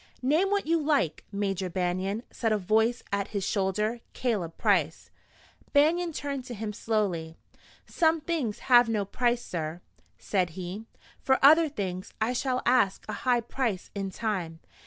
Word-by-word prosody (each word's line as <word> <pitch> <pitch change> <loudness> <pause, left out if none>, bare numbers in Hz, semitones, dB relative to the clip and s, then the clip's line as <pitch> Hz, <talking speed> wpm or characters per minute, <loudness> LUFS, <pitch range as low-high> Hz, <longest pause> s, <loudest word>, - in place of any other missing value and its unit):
"Name 315 +9 +3
what 405 0 +1
you 330 +1 +2
like, 285 - 0
Major 195 -2 -2
Banion," 185 +4 -1
said 225 -2 -1
a 215 - +3
voice 220 +5 +1
at 200 -1 -1
his 200 -2 -3
shoulder 210 +4 0
Caleb 200 -10 -2
Price. 175 -8 +1 0.6
Banion 330 +4 +3
turned 280 -3 -4
to 245 - -7
him 210 0 -4
slowly. 195 -8 -1 0.5
"Some 325 -1 +2
things 300 -9 -2
have 245 -2 +6
no 210 -3 0
price, 240 +4 0
sir," 160 -1 -4 0.4
said 185 -4 -1
he. 185 +4 -6 0.4
"For 265 0 +3
other 315 +2 +7
things 190 -8 -5
I 225 +3 +1
shall 255 0 -1
ask 240 -6 +2
a - - -4
high 245 -2 +1
price 230 -5 -3
in 195 -1 -3
time. 185 -6 -3
220 Hz, 155 wpm, -28 LUFS, 190-260 Hz, 0.6 s, other